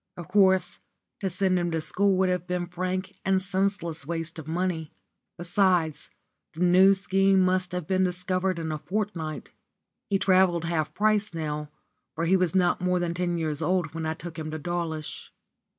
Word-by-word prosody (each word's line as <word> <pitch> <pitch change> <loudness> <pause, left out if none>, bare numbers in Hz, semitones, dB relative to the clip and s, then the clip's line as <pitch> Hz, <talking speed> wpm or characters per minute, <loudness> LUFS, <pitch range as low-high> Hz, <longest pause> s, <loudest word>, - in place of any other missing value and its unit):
Of 175 0 -8
course, 190 -2 +3 0.4
to 195 - -1
send 185 0 +1
him 175 0 -1
to 165 -1 -1
school 195 +4 +2
would 190 0 +2
have 180 -1 -2
been 180 -1 -1
frank 185 +2 -3
and 190 0 +2
senseless 190 -4 -1
waste 165 +1 -4
of 155 - -9
money. 165 -1 -2 0.5
Besides, 175 -3 +1 0.4
the 165 - -7
New 185 +2 +6
Scheme 195 +1 +2
must 185 0 +1
have 180 -2 -3
been 185 +2 +1
discovered 185 0 -1
in 160 -1 -3
a 155 - -3
fortnight. 180 -5 -4 0.6
He 200 - +2
travelled 185 -3 +3
half 160 -2 -1
price 215 -2 +2
now, 150 -2 -3 0.5
for 165 - -1
he 185 +3 +4
was 185 -1 +1
not 180 -2 +2
more 180 0 +1
than 175 -1 -1
ten 175 0 -1
years 155 -2 -2
old 175 -1 0
when 165 -1 -3
I 160 - -2
took 165 0 -8
him 155 0 -4
to 155 - -4
Dawlish. 160 -1 -4
180 Hz, 180 wpm, -26 LUFS, 165-190 Hz, 0.6 s, New